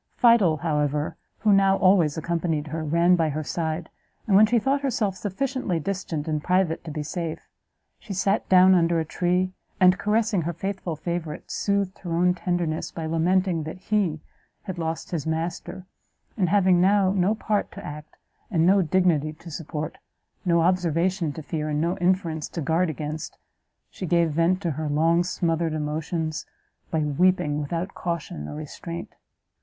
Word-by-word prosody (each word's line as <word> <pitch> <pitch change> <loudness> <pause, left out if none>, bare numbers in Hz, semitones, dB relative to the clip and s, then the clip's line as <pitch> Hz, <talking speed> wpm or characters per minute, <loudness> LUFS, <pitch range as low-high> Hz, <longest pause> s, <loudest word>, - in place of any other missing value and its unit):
Fidel, 225 -10 +5
however, 150 -1 -1 0.3
who 215 -2 +4
now 195 0 +4
always 180 -5 +4
accompanied 165 -2 -1
her, 160 +1 -3
ran 170 +4 +4
by 165 -3 +1
her 155 +1 -3
side, 160 +4 -3 0.4
and, 200 - +2
when 215 +2 +7
she 235 +2 +3
thought 270 +5 +1
herself 225 -8 0
sufficiently 210 -2 -2
distant 165 -3 -3
and 155 -1 -1
private 180 -3 +1
to - - -7
be 150 0 -4
safe, 165 +1 -5 0.5
she 215 - -11
sat 195 +2 0
down 185 0 +7
under 170 -2 +3
a 160 - -1
tree, 180 +3 0 0.3
and 185 -1 +5
caressing 215 -2 +1
her 170 +2 -2
faithful 190 -2 -4
favourite, 170 0 -5
soothed 200 -2 -1
her 170 -3 -3
own 180 +1 +3
tenderness 175 -3 -2
by 165 - -6
lamenting 170 +2 +1
that 155 +3 -6
he 185 -5 0 0.4
had 185 -2 -6
lost 165 0 -3
his 160 -4 -3
master; 165 +3 -3 0.5
and, 185 -6 +1
having 185 -2 +4
now 195 0 +4
no 195 +2 +2
part 215 -1 -1
to - - -9
act, 150 +1 -9 0.3
and 165 -5 +2
no 195 +2 +5
dignity 165 -3 +2
to 165 +2 -12
support, 155 0 -5 0.4
no 170 -2 +3
observation 175 0 +1
to 155 +2 -8
fear, 155 0 -3
and 150 0 0
no 170 +3 0
inference 175 -4 0
to - - -6
guard 165 +4 +1
against, 155 0 -5 0.5
she 185 - -6
gave 170 -1 +2
vent 170 +4 +2
to 170 - 0
her 155 +1 -3
long 165 +4 +3
smothered 165 -2 -1
emotions, 155 +1 -3 0.4
by 160 - 0
weeping 150 0 +2
without 170 +6 -3
caution 165 - -4
or - - -7
restraint. 160 +3 -7
170 Hz, 165 wpm, -25 LUFS, 155-185 Hz, 0.5 s, when